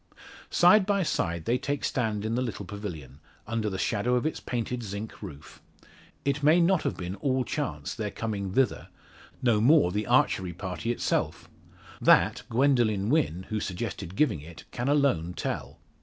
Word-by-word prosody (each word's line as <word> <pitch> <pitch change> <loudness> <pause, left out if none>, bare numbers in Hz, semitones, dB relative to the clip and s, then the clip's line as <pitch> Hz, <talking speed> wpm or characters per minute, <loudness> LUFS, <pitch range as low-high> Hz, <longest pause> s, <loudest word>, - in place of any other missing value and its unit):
Side 185 +3 +5
by 200 -2 +2
side 85 - -1
they 125 +2 +1
take 145 0 -2
stand 110 -4 -1
in 110 - -1
the 125 - 0
little 110 -5 -4
pavilion, 90 -9 -7 0.3
under 110 -1 -1
the 95 - -4
shadow 115 +5 0
of 125 - 0
its 155 - -1
painted 120 0 -3
zinc 105 0 -6
roof. 75 -9 -10 0.6
It 140 +1 0
may 155 +4 +5
not 175 0 +3
have - - -2
been 90 0 -4
all 130 +4 0
chance - - -3
their - - -3
coming 100 -4 -4
thither 135 +2 +1 0.6
no 115 -4 +3
more 125 - +5
the 105 +2 -2
archery 90 -2 +2
party 95 +6 -3
itself. 120 - -1 0.5
That - - +5
Gwendoline 115 -5 +2
Wynn, 120 - +1
who 110 - -1
suggested 95 -1 -5
giving 100 - +2
it, 85 +3 -11
can 120 +2 -3
alone 135 - +2
tell. - - -4
110 Hz, 165 wpm, -28 LUFS, 95-135 Hz, 0.6 s, Side